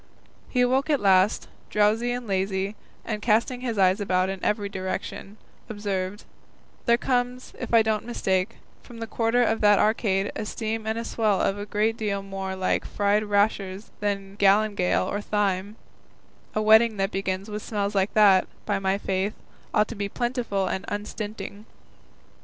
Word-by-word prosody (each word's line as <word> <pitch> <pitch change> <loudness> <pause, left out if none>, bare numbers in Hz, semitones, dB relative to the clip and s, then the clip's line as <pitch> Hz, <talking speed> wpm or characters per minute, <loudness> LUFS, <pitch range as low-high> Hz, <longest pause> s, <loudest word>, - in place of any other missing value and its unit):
He 250 - +1
awoke 260 +4 +2
at 290 -3 +3
last, 190 0 +3 0.2
drowsy 215 +3 +2
and 245 0 -3
lazy, 195 0 -1 0.3
and 215 -2 -3
casting 235 +3 +1
his 235 -4 -3
eyes 190 +1 +3
about 185 -1 +1
in 195 -1 -5
every 205 -1 0
direction, 195 +1 -5 0.3
observed, 205 -2 -3 0.6
"There 235 0 +5
comes, 250 0 -1
if 250 - -5
I 230 -1 +6
don't 220 -1 0
mistake, 190 -3 0 0.3
from 240 - -13
the 230 - -4
quarter 230 +2 +1
of 225 -1 0
that 205 -1 +6
arcade 205 -2 +1
a 215 - -3
steam 220 0 -3
and 220 +1 -1
a 230 - -3
smell 215 -5 +1
a 205 +1 -1
great 215 +2 0
deal 200 -2 -2
more 195 -1 -5
like 185 0 0
fried 205 +1 +1
rashers 205 -1 0
than 200 -1 -3
galingale 200 -2 +3
or 205 - -2
thyme; 205 -1 -1 0.8
a 215 - +1
wedding 220 0 +6
that 195 +1 0
begins 195 0 -2
with 210 0 -5
smells 205 -1 -2
like 195 0 0
that, 200 -3 +6 0.2
by 205 -2 0
my 195 0 +1
faith, 195 +1 -2 0.4
ought 210 - +3
to - - -5
be 200 -1 -3
plentiful 240 -5 -1
and 190 - -2
unstinting." 210 0 -6
205 Hz, 165 wpm, -25 LUFS, 195-220 Hz, 0.8 s, I